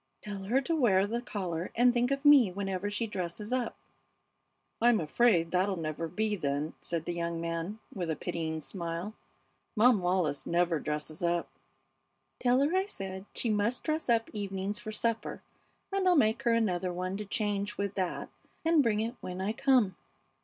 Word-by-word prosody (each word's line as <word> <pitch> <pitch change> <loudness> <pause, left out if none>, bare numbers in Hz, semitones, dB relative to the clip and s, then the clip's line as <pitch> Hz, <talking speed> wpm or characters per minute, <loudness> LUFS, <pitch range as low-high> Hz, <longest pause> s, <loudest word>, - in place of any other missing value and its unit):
"Tell 200 -2 -6
her 250 +7 +2
to 330 +5 -1
wear 200 -10 +4
the 235 +3 -2
collar 180 -7 -4
and 245 +1 +5
think 245 0 +2
of 275 +1 -2
me 275 -9 +7
whenever 195 +1 -2
she 210 +3 -1
dresses 205 +2 -4
up." 255 -2 -1 1.1
"I'm 235 -1 +5
afraid 170 0 +3
that'll 190 +2 +2
never 160 0 -3
be, 210 +5 -1
then," 145 -3 -2
said 165 -2 -3
the 175 - -2
young 170 -1 -2
man, 170 +4 -3 0.2
with 175 -4 -3
a 160 - 0
pitying 160 -2 -3
smile. 170 +4 -4 0.6
"Mom 230 0 +5
Wallis 175 -5 0
never 170 -1 +2
dresses 150 +1 -4
up." 170 0 0 0.9
"Tell 250 +1 +3
her 300 +6 +2
I 380 +1 +2
said 190 - -6
she 230 - 0
must 210 +4 0
dress 310 -3 -1
up 230 -1 +2
evenings 200 0 -3
for 215 - -6
supper, 225 +1 -2 0.5
and 390 -1 +1
I'll 360 - +6
make 225 -5 +3
her 240 -3 +2
another 185 -5 +1
one 185 +2 -3
to 210 - -5
change 205 -1 -2
with 200 -1 -2
that 185 -3 -2 0.4
and 330 -2 +5
bring 220 -5 +2
it 230 +2 -2
when 180 0 -5
I 195 +3 0
come." 240 -7 +3
200 Hz, 175 wpm, -30 LUFS, 175-235 Hz, 1.1 s, me